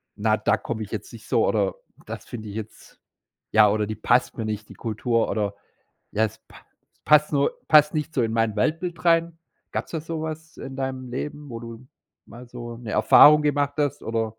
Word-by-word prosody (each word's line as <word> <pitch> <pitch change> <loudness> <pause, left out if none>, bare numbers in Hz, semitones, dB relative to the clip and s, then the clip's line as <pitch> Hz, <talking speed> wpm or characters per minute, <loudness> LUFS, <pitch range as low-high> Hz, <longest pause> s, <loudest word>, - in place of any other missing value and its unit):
na, - - +1
da - - +1
komme - - -4
ich - - -10
jetzt - - -6
nicht - - -12
so“ - - +2
oder: - - +1 0.3
„Das - - -7
finde 110 -4 -8
ich 100 - -8
jetzt“ 110 -1 -9 0.5
ja 110 -1 +6
oder: 105 +1 +1
„Die 110 - -4
passt 120 +5 +1
mir 110 - -3
nicht, 105 -1 -4
die - - -10
Kultur“ 115 +1 -1
oder, 100 -2 -1 0.6
ja: 110 - +1
„Es 110 - -8
pa - - -16 0.5
passt 150 0 +5
nur 140 -1 +2
passt 150 0 +6
nicht 155 0 -3
so 135 - +1
in 115 -1 0
mein 115 -2 +1
Weltbild 165 - -1
rein.“ 165 0 +3 0.3
Gab's - - -4
da 165 - -2
sowas 160 0 -6
in 135 - -8
deinem 130 -1 -4
Leben, 145 +3 -6
wo 115 -2 -6
du 115 +2 -10 0.4
mal 120 +2 -12
so 120 -1 -8
'ne 115 -2 -7
Erfahrung 150 +7 +7
gemacht 145 -1 0
hast 145 -3 -1
oder 115 0 -1
125 Hz, 200 wpm, -24 LUFS, 110-150 Hz, 0.6 s, Erfahrung